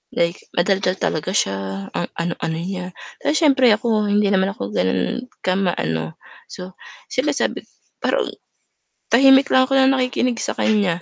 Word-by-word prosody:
like 170 Hz, +1 st, +1 dB, 0.2 s
madaldal 190 Hz, +1 st, +1 dB
talaga 160 Hz, +4 st, -2 dB
siya, 95 Hz, -, -2 dB
ang 175 Hz, -, -2 dB
ano-ano 170 Hz, -1 st, -3 dB
niya 180 Hz, +1 st, -4 dB, 0.3 s
'tas 295 Hz, -, 0 dB
siyempre 275 Hz, -5 st, +4 dB
ako 220 Hz, -3 st, 0 dB
hindi 205 Hz, 0 st, +2 dB
naman 190 Hz, 0 st, +2 dB
ako 100 Hz, +1 st, -6 dB
gano'n 95 Hz, -, -1 dB, 0.2 s
kama 185 Hz, -1 st, 0 dB
ano, 80 Hz, 0 st, -3 dB, 0.3 s
so 180 Hz, +1 st, -9 dB, 0.4 s
siyempre 255 Hz, +3 st, 0 dB
sabi -, -, -1 dB
ko -, -, -30 dB, 0.3 s
pero, -, -, 0 dB, 0.9 s
tahimik 270 Hz, +3 st, +6 dB
lang 260 Hz, 0 st, +4 dB
ako 270 Hz, -, -3 dB
na 265 Hz, -, +5 dB
nakikinig 255 Hz, -2 st, 0 dB
sa -, -, -2 dB
kanya. 200 Hz, -6 st, +1 dB
195 Hz, 155 wpm, -20 LUFS, 170-250 Hz, 0.9 s, tahimik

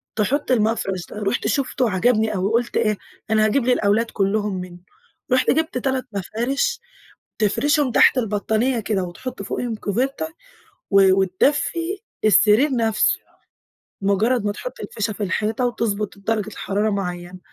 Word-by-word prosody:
تحط 260 Hz, +6 st, 0 dB
المفرش 210 Hz, -6 st, 0 dB
ده، -, -, -9 dB
رُحت 200 Hz, +5 st, 0 dB
شفته 255 Hz, -3 st, 0 dB
عجبني 215 Hz, +2 st, +2 dB
أوي 190 Hz, +3 st, 0 dB
قُلت 235 Hz, +1 st, 0 dB
إيه، 215 Hz, -1 st, +1 dB, 0.3 s
أنا 215 Hz, 0 st, +3 dB
هاجيب 235 Hz, +4 st, +1 dB
للأولاد 230 Hz, -2 st, +2 dB
كُلُّهم 200 Hz, -1 st, 0 dB
منه، 180 Hz, -1 st, -10 dB, 0.5 s
رُحت 255 Hz, 0 st, +3 dB
جبت 315 Hz, -2 st, 0 dB
3 260 Hz, 0 st, -1 dB
مفارش 240 Hz, -, -1 dB, 0.6 s
تفرشهم 275 Hz, +5 st, +2 dB
تحت 260 Hz, -, +5 dB
البطانية 220 Hz, +2 st, 0 dB
كده 205 Hz, -3 st, -1 dB
وتحط 200 Hz, +6 st, -7 dB
فوقيهُم 235 Hz, +3 st, -3 dB
كوفيرته 260 Hz, +9 st, -2 dB, 0.6 s
و 195 Hz, -2 st, +6 dB
وتدفي 295 Hz, -, 0 dB, 0.3 s
السرير 215 Hz, +7 st, +5 dB
نفسه، 225 Hz, -2 st, +2 dB, 0.8 s
مجرد 205 Hz, +4 st, +1 dB
ما 205 Hz, -, 0 dB
تحط -, -, -8 dB
الفيشة 215 Hz, 0 st, -3 dB
في 210 Hz, -, -7 dB
الحيطة 210 Hz, +5 st, 0 dB
وتُضبط 215 Hz, -4 st, -2 dB
درجة 215 Hz, +1 st, -1 dB
الحرارة 205 Hz, 0 st, -1 dB
معينة، 180 Hz, -2 st, -4 dB
215 Hz, 135 wpm, -22 LUFS, 200-250 Hz, 0.8 s, و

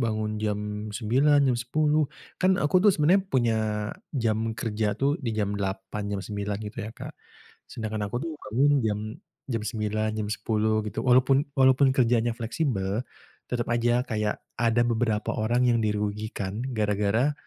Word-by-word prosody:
bangun 110 Hz, -2 st, -1 dB
jam 105 Hz, -1 st, 0 dB, 0.4 s
9.00, 135 Hz, +8 st, +3 dB
jam 125 Hz, -, +2 dB
10.00 150 Hz, +4 st, +1 dB, 0.3 s
kan 185 Hz, 0 st, +4 dB
aku 150 Hz, +5 st, +2 dB
tuh 210 Hz, -, +8 dB
sebenarnya 170 Hz, +6 st, +4 dB
punya 120 Hz, -6 st, +2 dB, 0.6 s
jam 115 Hz, -2 st, 0 dB
kerja 105 Hz, -2 st, -1 dB
tuh 140 Hz, +2 st, +2 dB
di 120 Hz, -, -2 dB
jam 105 Hz, -2 st, 0 dB
8.00, 95 Hz, +1 st, -3 dB
jam 100 Hz, -, -2 dB
9.00 100 Hz, -1 st, -3 dB
gitu 105 Hz, +3 st, -8 dB
ya, -, -, -6 dB
Kak. -, -, -8 dB, 0.6 s
Sedangkan 110 Hz, -2 st, -4 dB
aku 115 Hz, -, -4 dB
tuh 165 Hz, -, -4 dB, 0.2 s
bangun 135 Hz, +6 st, +3 dB
jam 105 Hz, -2 st, 0 dB, 0.5 s
jam 115 Hz, -4 st, -1 dB
9.00, 110 Hz, 0 st, -1 dB
jam 105 Hz, -1 st, -2 dB
10.00 110 Hz, 0 st, 0 dB
gitu. 105 Hz, -, -3 dB
Walaupun 135 Hz, +3 st, +4 dB
walaupun 130 Hz, +1 st, +5 dB
kerjanya 120 Hz, -2 st, +2 dB
fleksibel 115 Hz, -, -1 dB, 0.5 s
tetep 120 Hz, -1 st, -2 dB
aja 120 Hz, +1 st, +2 dB
kayak 105 Hz, -2 st, -1 dB, 0.2 s
ada 115 Hz, 0 st, +2 dB
beberapa 110 Hz, -2 st, 0 dB
orang 120 Hz, +3 st, +2 dB
yang 120 Hz, -, +4 dB
dirugikan 105 Hz, 0 st, -2 dB
gara-gara 105 Hz, +5 st, +1 dB
115 Hz, 150 wpm, -26 LUFS, 105-125 Hz, 0.6 s, tuh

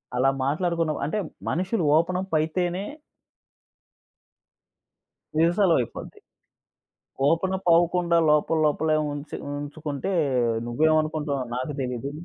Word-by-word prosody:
అలా 130 Hz, +2 st, +3 dB, 0.2 s
మాట్లాడుకున్నాం. 165 Hz, +1 st, 0 dB
అంటే 155 Hz, +8 st, -2 dB, 0.3 s
మనుషులు 185 Hz, +3 st, -1 dB
ఓపెన‌ప్ 185 Hz, +2 st, -1 dB
అయితేనే 175 Hz, +4 st, -1 dB, 2.5 s
నిమిషాల్లో 170 Hz, +2 st, +3 dB
అయిపోద్ది. 120 Hz, -, -6 dB, 1.1 s
ఓపెన‌ప్ 185 Hz, +3 st, 0 dB
అవ్వకుండా 170 Hz, 0 st, +2 dB
లోపల 150 Hz, +2 st, +2 dB
లోపలే 155 Hz, +1 st, +1 dB, 0.2 s
ఉంచి 145 Hz, +1 st, -6 dB, 0.2 s
ఉంచుకుంటే, 145 Hz, +3 st, -4 dB, 0.5 s
నువ్వేమనుకుంటున్నావో 155 Hz, +1 st, +1 dB
నాకు 130 Hz, +4 st, -3 dB
తెలీదు. 125 Hz, +1 st, -3 dB
160 Hz, 85 wpm, -25 LUFS, 145-175 Hz, 2.5 s, అలా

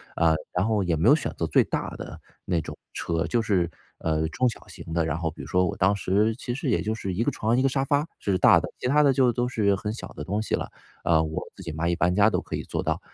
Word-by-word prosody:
啊， 80 Hz, -1 st, +4 dB, 0.2 s
然 90 Hz, +3 st, 0 dB
后 110 Hz, -3 st, +1 dB
也 85 Hz, -2 st, +1 dB
没 80 Hz, -, +1 dB
有 145 Hz, -, +8 dB
选 150 Hz, -, -3 dB
择 85 Hz, -, 0 dB
最 80 Hz, -, +4 dB
大 -, -, -3 dB
的 -, -, -8 dB, 0.2 s
那 90 Hz, -3 st, 0 dB
种 80 Hz, -, -6 dB, 0.2 s
车， 80 Hz, -1 st, -2 dB
就 120 Hz, -, +1 dB
是， 100 Hz, -7 st, +1 dB, 0.3 s
呃， 80 Hz, 0 st, 0 dB
中 125 Hz, +10 st, +1 dB
小 115 Hz, -, -10 dB
型 -, -, -10 dB
的。 80 Hz, 0 st, +1 dB
然 80 Hz, -2 st, -1 dB
后 80 Hz, 0 st, -1 dB
比 80 Hz, -, -10 dB
如 -, -, -8 dB
说 90 Hz, 0 st, +2 dB
我 -, -, -4 dB
当 95 Hz, +2 st, +3 dB
时 105 Hz, +3 st, +1 dB
其 120 Hz, -, -3 dB
实 135 Hz, -2 st, -1 dB
也 -, -, +2 dB
就 110 Hz, +1 st, -1 dB
是 100 Hz, -4 st, -4 dB
一 105 Hz, +6 st, 0 dB
个 -, -, +2 dB
床 110 Hz, +2 st, 0 dB
一 130 Hz, -, +2 dB
个 135 Hz, -, +3 dB
沙 135 Hz, +1 st, 0 dB
发 145 Hz, +3 st, +1 dB
是 95 Hz, -2 st, -1 dB
大 -, -, +7 dB
的， -, -, -4 dB
其 125 Hz, -, -2 dB
它 150 Hz, +3 st, +4 dB
的 140 Hz, -2 st, +5 dB
就 125 Hz, -1 st, +4 dB
都 120 Hz, +1 st, -1 dB
是 105 Hz, -5 st, +2 dB
很 105 Hz, +2 st, -4 dB
小 115 Hz, -, -7 dB
的 75 Hz, -, -6 dB
东 100 Hz, +7 st, -1 dB
西 110 Hz, -, 0 dB
了。 -, -, -5 dB, 0.3 s
呃， 80 Hz, -2 st, +4 dB
我 80 Hz, 0 st, -4 dB
自 -, -, -11 dB
己 85 Hz, -3 st, -5 dB
嘛 80 Hz, +2 st, -2 dB
一 85 Hz, -, +1 dB
搬 90 Hz, 0 st, +1 dB
家 105 Hz, +2 st, +5 dB
都 -, -, 0 dB
可 -, -, -5 dB
以 -, -, -4 dB
做 -, -, -3 dB
到。 -, -, -1 dB
100 Hz, 315 characters per minute, -26 LUFS, 85-120 Hz, 0.3 s, 有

